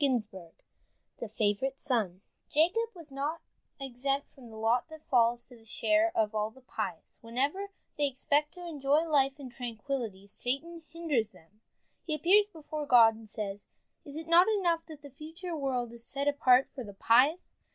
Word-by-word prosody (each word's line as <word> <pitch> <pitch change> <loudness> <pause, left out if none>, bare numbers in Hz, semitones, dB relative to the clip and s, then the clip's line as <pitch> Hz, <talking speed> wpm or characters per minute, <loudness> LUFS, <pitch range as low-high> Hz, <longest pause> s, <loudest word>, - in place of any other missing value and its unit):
I - - +6
JOSEPH 210 -9 -4 0.6
THE 235 - -4
FAVORITE 215 +5 0
SON 205 -8 -1 0.3
Jacob 360 +10 +2
was 325 -4 -12
not 290 +4 -2 0.4
exempt 275 +2 -2
from 255 -4 -15
the 220 - -11
lot 225 +6 +1
that 315 -1 -12
falls 240 -1 +3
to 245 - -16
the 225 - -18
share 320 +9 +2
of 215 -1 +2
all 215 0 0
the 260 +4 -18
pious. 205 -8 -5
Whenever 280 +13 -1 0.3
they 290 - +3
expect 290 +3 0
to 355 -1 -9
enjoy 290 -2 +2
life 275 -2 +2
in 260 -3 -8
tranquillity, 235 -4 -4
Satan 275 +11 -4
hinders 300 -10 -1
them. 200 +7 -22 0.4
He 310 - -1
appears 400 +6 +5
before 310 -5 -6
God, 230 -3 +7
and 220 -1 -13
says: 205 -2 -5 0.4
"Is 285 -1 -10
it 320 0 -6
not 340 +2 +6
enough 340 -4 +1
that 310 -2 -11
the 285 - -10
future 325 +5 -7
world 255 -5 -2
is 235 -1 -12
set 280 +3 -3
apart 265 -3 +5
for 260 - -6
the 200 -3 -10
pious? 265 - +3
270 Hz, 175 wpm, -30 LUFS, 230-310 Hz, 0.6 s, God